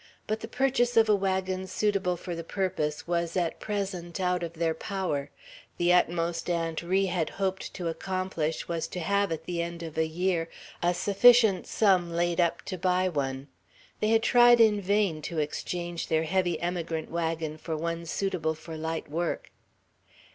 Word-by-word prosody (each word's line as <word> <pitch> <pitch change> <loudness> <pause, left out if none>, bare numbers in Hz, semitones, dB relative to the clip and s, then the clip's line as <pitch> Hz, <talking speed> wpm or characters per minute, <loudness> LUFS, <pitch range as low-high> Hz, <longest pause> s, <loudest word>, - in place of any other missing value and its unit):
But 215 +1 -2
the 225 - -6
purchase 245 -1 +1
of 225 -1 +6
a 210 - +6
wagon 190 -1 -1
suitable 185 -2 0
for 175 +1 -6
the 165 0 -5
purpose 160 -5 -2
was 170 0 -1
at 175 -2 -1
present 190 -4 -4
out 180 -1 +1
of 170 -1 -4
their 165 -1 0
power; 160 -5 -3 0.5
the 175 +1 +3
utmost 170 -1 +1
Aunt 165 -2 -1
Ri 190 +3 +1
had 175 -3 -1
hoped 190 -1 -2
to 175 -3 -3
accomplish 170 -2 -2
was 170 -1 -2
to 180 - -6
have, 200 +2 +1
at 160 - -3
the 175 -1 -2
end 170 0 -5
of 160 -1 -5
a 160 - +2
year, 170 0 -1 0.3
a 175 +1 +2
sufficient 205 +1 +5
sum 185 -5 +3
laid 175 +1 +1
up 170 -1 0
to 185 -3 -5
buy 185 +1 +2
one. 135 -3 -3 0.5
They 215 - +1
had 225 0 +3
tried 240 -1 +6
in 215 -2 +5
vain 195 -5 +1
to 165 +2 -5
exchange 170 +3 -3
their 160 0 +2
heavy 175 0 0
emigrant 170 -2 -3
wagon 165 -2 -2
for 160 -1 -4
one 170 +1 -3
suitable 165 -4 -1
for 160 +1 -9
light 160 +1 -3
work. 165 +3 -3
175 Hz, 175 wpm, -28 LUFS, 165-190 Hz, 0.5 s, of